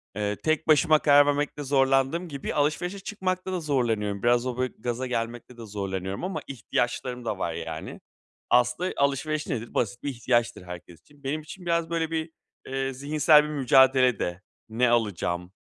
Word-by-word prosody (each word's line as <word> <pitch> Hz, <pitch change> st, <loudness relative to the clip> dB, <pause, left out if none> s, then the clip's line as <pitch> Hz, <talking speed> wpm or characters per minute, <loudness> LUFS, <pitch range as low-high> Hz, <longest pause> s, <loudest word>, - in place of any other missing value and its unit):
eee, 105 Hz, 0 st, -1 dB
tek 155 Hz, +6 st, -1 dB
başıma 155 Hz, 0 st, +5 dB
karar 145 Hz, 0 st, +6 dB
vermekte 145 Hz, 0 st, -1 dB
zorlandığım 135 Hz, +5 st, +2 dB
gibi 140 Hz, -3 st, -5 dB
alışverişe 155 Hz, +6 st, 0 dB
çıkmakta 190 Hz, -2 st, -3 dB
da 180 Hz, -, -1 dB
zorlanıyorum. 115 Hz, -9 st, -1 dB
Biraz 120 Hz, +1 st, +3 dB
o, 125 Hz, -1 st, -3 dB
böyle, 130 Hz, 0 st, -1 dB
gaza 120 Hz, +2 st, -3 dB
gelmekte 120 Hz, 0 st, -4 dB
de 115 Hz, -, -8 dB
zorlanıyorum 95 Hz, -, -4 dB
ama 175 Hz, -5 st, -3 dB
ihtiyaçlarım 125 Hz, 0 st, -2 dB
da 105 Hz, -, -2 dB
var 85 Hz, -3 st, -1 dB
yani. 80 Hz, -1 st, -6 dB, 0.5 s
Aslında 125 Hz, +9 st, +2 dB
alışveriş 140 Hz, +2 st, 0 dB
nedir? 120 Hz, -4 st, -4 dB
Basit 120 Hz, +1 st, -1 dB
bir 145 Hz, -, -1 dB
ihtiyaçtır 120 Hz, -4 st, 0 dB
herkes 90 Hz, -2 st, -10 dB
için. 145 Hz, -1 st, -24 dB
Benim 150 Hz, +3 st, -2 dB
için 180 Hz, +4 st, -11 dB
biraz 170 Hz, -1 st, 0 dB
böyle 165 Hz, -1 st, -1 dB
bir, 160 Hz, 0 st, -2 dB, 0.4 s
eee, 135 Hz, 0 st, -2 dB
zihinsel 150 Hz, +2 st, +4 dB
bir 150 Hz, -, -5 dB
mücadele 130 Hz, -3 st, +4 dB
de. 90 Hz, +2 st, -3 dB, 0.3 s
Ne 120 Hz, +2 st, +2 dB
alacağım, 90 Hz, -6 st, -1 dB
130 Hz, 165 wpm, -26 LUFS, 115-150 Hz, 0.5 s, karar